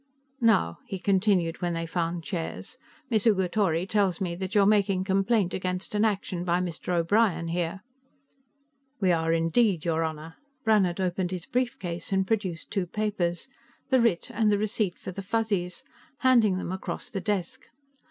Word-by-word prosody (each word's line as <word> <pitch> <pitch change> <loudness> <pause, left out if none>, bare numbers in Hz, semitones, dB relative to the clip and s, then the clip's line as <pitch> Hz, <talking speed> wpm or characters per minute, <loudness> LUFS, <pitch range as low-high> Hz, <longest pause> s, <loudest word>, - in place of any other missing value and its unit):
"Now," 85 - +3
he 195 - -4
continued, 190 -3 +1
when 175 -1 -1
they 165 0 -2
found 170 0 -2
chairs, 165 -2 -5 0.3
"Miss 220 0 +3
Ugatori 190 -4 +2
tells 200 -4 +1
me 180 -3 -2
that 190 +3 -5
you 205 - +6
are - - +5
making 200 -2 +3
complaint 195 0 +1
against 185 +1 -3
an 210 +1 +2
action 195 -4 -1
by 175 0 +1
Mr. 180 0 -4
O'Brien 170 -1 +2
here." 175 +2 -2 1.2
"We 185 -3 +3
are 165 -1 +1
indeed, 165 +2 +2
your 165 -1 +1
Honor." 160 0 -5 0.3
Brannhard 200 -6 +3
opened 185 -1 0
his 180 -2 -5
briefcase 240 -10 -2
and 190 0 +2
produced 190 -5 -2
two 195 -4 -1
papers 190 -2 -2 0.4
the 260 -2 +4
writ, 230 -1 +1
and 215 -1 +2
the 205 - +3
receipt 210 -3 -1
for - - -7
the 195 - -6
Fuzzies, 200 -2 -1 0.4
handing 235 -7 +4
them 185 - -4
across 190 - -5
the 195 - -3
desk. 195 -5 -3
185 Hz, 160 wpm, -27 LUFS, 170-210 Hz, 1.2 s, you